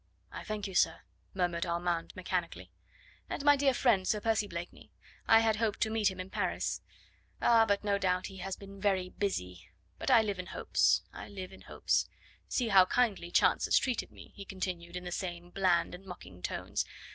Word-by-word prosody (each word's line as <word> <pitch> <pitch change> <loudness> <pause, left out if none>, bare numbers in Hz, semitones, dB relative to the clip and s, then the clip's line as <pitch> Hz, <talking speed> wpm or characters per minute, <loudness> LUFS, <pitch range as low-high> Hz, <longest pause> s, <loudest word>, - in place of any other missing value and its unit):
"I - - -7
thank 215 -1 -4
you, 195 - -5
sir," 165 -2 +2 0.3
murmured 175 -2 0
Armand 170 0 -1
mechanically. 180 -2 -3 0.6
"And 280 - -4
my 290 0 +7
dear 280 -1 +3
friend, 230 -7 +2
Sir 210 - +1
Percy 220 -1 +1
Blakeney? 170 -1 -8 0.4
I 225 0 +7
had 220 -1 +2
hoped 220 -1 0
to 220 - +2
meet 220 -2 +2
him 190 -1 -8
in 185 +1 -6
Paris. - - -1 0.6
Ah! 225 -1 +5
but 200 0 +1
no 200 -1 +1
doubt 185 -1 +1
he 195 - -8
has 190 0 -4
been 195 0 -12
busy - - -14
very 190 -2 +1
busy; 90 - -4 0.3
but - - -2
I 235 -4 +6
live 205 -3 -3
in 180 - -5
hopes - - +2
I - - -8
live 190 -2 -8
in - - -13
hopes. - - 0 0.4
See 245 -3 0
how 190 -3 +7
kindly 205 -5 +1
Chance - - +3
has - - +4
treated 255 -4 -1
me," - - -14
he 200 - -8
continued 180 -3 -5
in 180 - -4
the 175 - -6
same 175 -1 -5
bland 180 -3 +2
and 180 +2 -9
mocking 175 - -11
tones. - - -2
190 Hz, 200 wpm, -31 LUFS, 180-215 Hz, 0.6 s, my